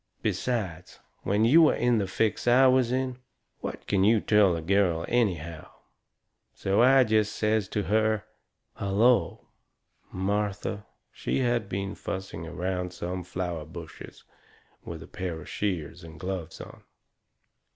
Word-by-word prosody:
Besides, 95 -9 -2 0.2
when 105 +3 +1
you 155 +6 +7
are - - +1
in 120 -2 +2
the 100 - -1
fix 110 +5 -1
I 125 +2 +6
was 130 -2 +4
in, 130 -1 -1 0.4
what - - -6
can 95 -2 +1
you 110 +2 +5
tell 105 -4 +4
a 85 - -4
girl 90 -2 +2
anyhow? 85 -9 -1 0.9
So 95 +3 +1
I 130 +2 +6
jest 110 -2 +1
says 105 -2 +1
to 105 - -2
her: 110 +1 +1 0.5
"Hullo!" 110 +5 +2 0.7
Martha, 100 +1 -2 0.2
she - - -2
had 120 -4 0
been 100 +1 -3
fussing 95 -4 -6
around 90 +1 -3
some 90 +1 -4
flower 90 -2 -4
bushes 80 +1 -11 0.6
with - - -7
a - - -13
pair 90 -3 -5
of - - -11
shears 90 -9 -3
and 80 -1 -11
gloves 90 -2 -5
on. - - -11
100 Hz, 140 wpm, -27 LUFS, 90-110 Hz, 0.9 s, you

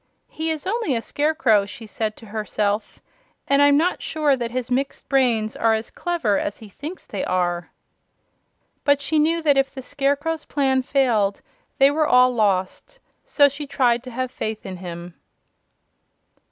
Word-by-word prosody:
"He 320 +1 -3
is 315 -2 -3
only 405 - 0
a - - 0
Scarecrow," 290 -10 +2
she 225 +2 -9
said 215 +1 -3
to 225 - -13
herself, 210 0 -2 0.5
"and 280 0 +4
I'm 285 0 +6
not 345 +4 +1
sure 300 -3 +1
that 240 -2 -3
his 250 0 -4
mixed 270 +2 -2
brains 240 -6 +1
are 225 -1 +2
as 220 0 -5
clever 320 - 0
as 200 - -3
he 220 - -12
thinks 305 - -8
they 200 - -4
are." 175 -1 -1 1.1
But 285 -1 +3
she 305 +2 0
knew 330 +2 +2
that 290 -3 +4
if 270 0 0
the 265 - -8
Scarecrow's 285 +4 -1
plan 265 -2 +1
failed 240 -7 +1 0.4
they 275 +1 +6
were 305 +1 +1
all 250 0 +5
lost; 210 - -1 0.3
so 285 -2 +4
she 285 +1 -6
tried 245 -3 +2
to - - -7
have 255 +1 -3
faith 220 -3 -5
in 185 -1 -6
him. 175 -1 -8
255 Hz, 165 wpm, -22 LUFS, 215-290 Hz, 1.1 s, I'm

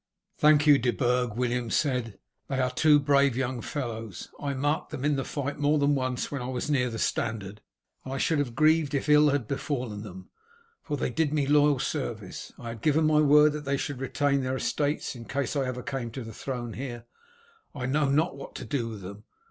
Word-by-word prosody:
"Thank 150 0 +5
you, 145 -2 +7
De 120 - +1
Burg," 125 -2 0
William 120 -1 -1
said; 125 -5 0 0.3
"they 135 -1 -2
are 130 0 +1
two 150 +3 +5
brave 140 -3 +3
young 130 -2 -2
fellows. 115 - -5
I 140 -1 -2
marked 145 +4 -1
them 145 -3 -4
in 150 -1 +2
the 135 - -1
fight 145 +1 -4
more 145 +1 +3
than 145 0 +3
once 130 -2 -2
when 140 -3 -3
I 125 - -4
was 130 +3 -3
near 125 -3 +2
the 115 - -5
standard, 105 -2 -2 0.4
and 130 - -7
I 135 - -2
should 155 +2 +1
have 125 -5 -2
grieved 155 0 +3
if 140 - -1
ill 150 0 +6
had 140 -5 0
befallen 125 -6 -3
them, 95 -3 -10 0.5
for 145 - -3
they 130 - -1
did 150 +3 0
me 150 -2 +1
loyal 145 0 +4
service. - - -4
I 120 - -7
had 115 -2 -7
given 155 +3 +3
my 155 0 +4
word 150 +1 +6
that 150 -1 -6
they 140 0 0
should 135 -1 -4
retain 140 +1 +1
their 130 0 -1
estates 145 +2 -1
in 115 -1 -9
case 140 +2 -2
I 135 -2 0
ever 125 -1 -4
came 130 -4 -4
to 130 - -5
the 115 0 -9
throne 120 -3 -5
here. 120 -3 -6 0.7
I 130 -3 -3
know 145 +2 +1
not 155 +3 +2
what 140 - -10
to - - -6
do 125 -6 -2
with 110 -3 -8
them. 100 +3 -9
135 Hz, 220 wpm, -27 LUFS, 120-145 Hz, 0.7 s, you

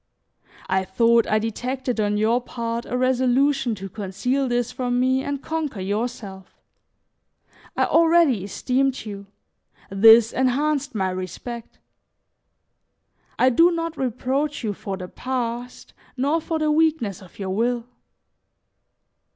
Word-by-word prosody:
I 190 0 +1
thought 230 +4 +3
I 215 - +2
detected 245 +3 -3
on 210 -1 +1
your 225 +4 +2
part 235 -1 -4
a 250 - -2
resolution 260 0 +2
to 195 -1 -7
conceal 225 +7 -2
this 245 -1 -1
from 245 -1 -1
me 260 +1 +2
and 285 -1 -4
conquer 315 -9 -3
yourself. 200 -1 -5 1.2
I - - +3
already 325 - +4
esteemed 260 +6 -1
you, 200 -2 -8 0.6
this 225 +3 +7
enhanced 280 +1 0
my 190 -2 0
respect. 185 +6 -7 1.6
I 255 - +4
do 335 +8 +5
not 330 -1 -3
reproach 265 +3 -2
you 210 -2 -1
for 195 0 -6
the 180 -1 -7
past, 245 +1 -5 0.2
nor 290 +6 +1
for 325 0 -2
the 310 -1 +1
weakness 300 - +1
of 185 -2 -16
your 190 -2 -4
will. 235 +3 0
245 Hz, 125 wpm, -23 LUFS, 210-270 Hz, 1.6 s, this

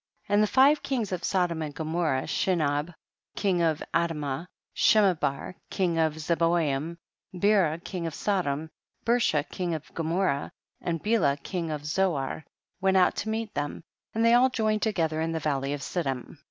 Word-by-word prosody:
3. 205 - -4
And 205 - +5
the 215 - +4
five 275 +6 +5
kings 240 -8 -2
of 180 -2 -3
Sodom 175 -4 0
and 150 -2 -5
Gomorrah, 160 -4 -1
Shinab 155 -3 0 0.4
king 185 -4 +1
of 160 -2 +1
Ad 170 -1 +1
mah, 145 +2 -4 0.3
Shemeber 180 -9 +3 0.2
king 175 -4 0
of 160 -1 +2
Zeboyim, 165 -1 0 0.4
Bera 185 -4 +3
king 170 0 -5
of 160 - -5
Sodom, 160 -6 -1 0.3
Bersha 230 -11 +2
king 175 -3 -2
of 155 - -9
Gomorrah, 165 -3 0 0.3
and 165 -2 -2
Bela 210 -11 +2
king 170 +3 -4
of 150 -1 -4
Zo 185 +3 +1
ar, 135 +3 -3 0.4
went 190 0 +3
out 180 - +4
to 220 - -2
meet 220 -1 -3
them, 145 +2 -3 0.3
and 225 +1 +2
they 230 - +6
all 250 +2 +6
joined 215 -4 0
together 165 -7 0
in 165 0 -1
the 160 - -1
valley 140 -2 -1
of 145 -1 -3
Siddim. 135 -8 -3
170 Hz, 170 wpm, -27 LUFS, 150-195 Hz, 0.4 s, they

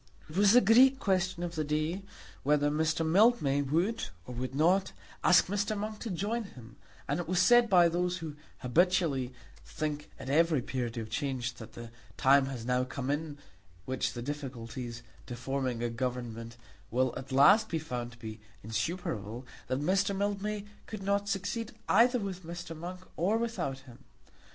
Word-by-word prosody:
It 155 - -11
was 200 +2 +5
the 245 - +8
great 255 +6 +6
question 185 -7 0
of 175 -1 -3
the 155 -2 -1
day 155 +5 -1 0.4
whether 145 +1 +2
Mr. 160 +2 +1
Mildmay 160 - +4
would 170 +11 0 0.2
or 125 - -7
would 130 +2 -4
not 180 +6 +3 0.3
ask 175 - +6
Mr. 205 +2 -1
Monk 215 +1 -4
to 230 - -5
join 210 +5 -2
him; 125 - -13 0.3
and 145 +4 0
it 175 - -4
was 180 +1 +1
said 240 +5 +6
by 175 -3 +6
those 180 +1 0
who 160 -4 -6 0.3
habitually 150 -2 +2 0.3
think 150 -1 -4
at - - -9
every 155 -1 +3
period 125 -3 -3
of 110 -2 -5
change 125 -1 -2
that 110 -1 -11
the 115 0 -9 0.3
time 135 0 +5
has 125 -4 -5
now 125 0 +1
come 130 +1 -3
in 145 0 -3 0.5
which 130 0 -1
the 120 - -5
difficulties 125 -4 -6 0.2
to 120 - -5
forming 130 -1 -2
a 120 - 0
government 115 -1 -4 0.3
will 130 0 +1
at 135 +1 -7
last 200 +12 +6
be 165 - 0
found 125 -6 -5
to - - -16
be 110 -2 -8 0.2
insuperable, 115 - -3 0.2
that 130 - -1
Mr. 195 +4 +1
Mildmay 205 +1 -2 0.2
could 215 -3 -6
not 200 +1 0
succeed 205 +4 -2
either 245 +2 +5
with 195 -4 -4
Mr. 170 0 -7
Monk 180 +3 -7
or 195 +7 +2
without 225 - -2
him. 130 -2 -15
155 Hz, 170 wpm, -31 LUFS, 130-195 Hz, 0.5 s, the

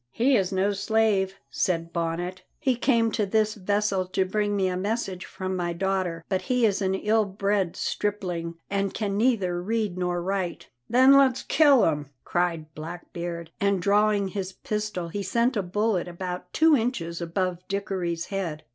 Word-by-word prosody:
"He 255 - +2
is 190 -5 +1
no 195 +2 +1
slave," 200 -2 +1 0.2
said 165 -2 -1
Bonnet; 170 +2 -2 0.2
"he 260 -3 +1
came 235 -2 +2
to 215 - 0
this 215 +1 +1
vessel 200 -1 0
to 185 +1 0
bring 205 +2 0
me 190 -2 +2
a 180 - -1
message 195 -1 -2
from 185 0 -4
my 175 -1 -1
daughter, 180 -2 -1
but 190 -1 0
he 250 +4 +2
is 205 -1 +1
an 190 0 +1
ill 215 +3 +2
bred 195 -2 -1
stripling, 180 -5 -2
and 200 -1 -1
can 205 -3 -1
neither 200 -6 +1
read 210 -2 -1
nor 180 -1 0
write." 185 -1 -3 0.2
"Then 260 +3 +6
let's 270 -2 +4
kill 285 -6 +5
him!" 150 -3 -1
cried 165 -3 -1
Blackbeard, 170 +1 -6
and 200 -1 +2
drawing 205 +1 +2
his 190 -1 -4
pistol 210 -4 -3
he 200 +4 -3
sent 235 +6 +1
a 205 - +1
bullet 195 +1 0
about 180 0 -6
two 320 -1 +5
inches 185 -9 -2
above 175 +1 -1
Dickory's 185 -4 -2
head. 170 -6 -3
195 Hz, 165 wpm, -26 LUFS, 175-210 Hz, 0.2 s, Then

